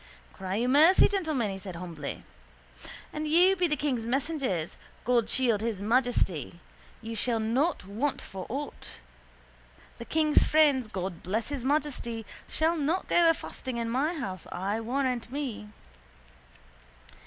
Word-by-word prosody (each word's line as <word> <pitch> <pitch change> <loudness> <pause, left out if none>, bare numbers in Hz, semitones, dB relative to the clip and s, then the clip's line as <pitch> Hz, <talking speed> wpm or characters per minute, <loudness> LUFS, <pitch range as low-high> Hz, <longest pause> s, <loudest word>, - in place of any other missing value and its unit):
—Cry 190 0 -4
you 235 +4 +1
mercy, 310 +8 +6
gentlemen, 310 - -1
he 195 - -6
said 185 -2 -7
humbly. 170 -5 -6 0.9
An 305 0 -3
you 355 +5 +5
be 360 -1 +2
the 300 - +1
king's 255 -7 -1
messengers 260 - -1 0.3
(God 235 -2 +2
shield 235 -5 +2
His 225 -3 -2
Majesty!) 205 - 0 0.4
you 225 0 -5
shall 230 +1 +1
not 250 - 0
want 230 +9 -2
for 190 -1 -8
aught. 280 +4 -6 1.0
The 235 - -6
king's 305 +1 +3
friends 290 -6 +4
(God 185 -4 -5
bless 215 +7 -2
His 280 -4 -4
Majesty!) 260 -5 -1 0.2
shall 320 +2 +1
not 320 +5 -1
go 340 -1 +5
afasting 260 -5 -3
in 230 -1 -2
my 295 +8 +1
house 190 - -5
I 200 +4 -2
warrant 250 0 -1
me. 260 -7 -4
245 Hz, 140 wpm, -28 LUFS, 210-295 Hz, 1.0 s, mercy